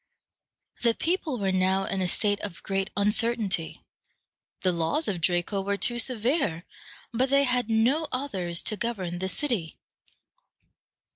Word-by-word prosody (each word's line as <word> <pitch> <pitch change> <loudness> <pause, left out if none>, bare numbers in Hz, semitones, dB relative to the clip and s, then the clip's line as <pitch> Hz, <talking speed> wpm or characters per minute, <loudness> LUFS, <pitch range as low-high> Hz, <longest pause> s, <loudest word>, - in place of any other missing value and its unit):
The 235 -1 +3
people 330 -5 -1
were 195 -3 0
now 190 +1 +2
in 195 -1 -2
a 185 - +1
state 205 +2 +2
of 200 -5 -6
great 195 0 -1
uncertainty. 210 -4 0 0.8
The 185 - +3
laws 170 - 0
of 185 -4 -2
Draco 175 +3 +1
were 200 +1 -1
too 240 +3 +1
severe, 235 - 0 0.5
but 255 +3 +1
they 280 +1 +4
had 250 -3 0
no 250 +8 +2
others 190 -11 -1
to 215 - +1
govern 190 -6 -3
the 190 +1 -2
city. 205 - -2
205 Hz, 140 wpm, -27 LUFS, 185-245 Hz, 0.8 s, they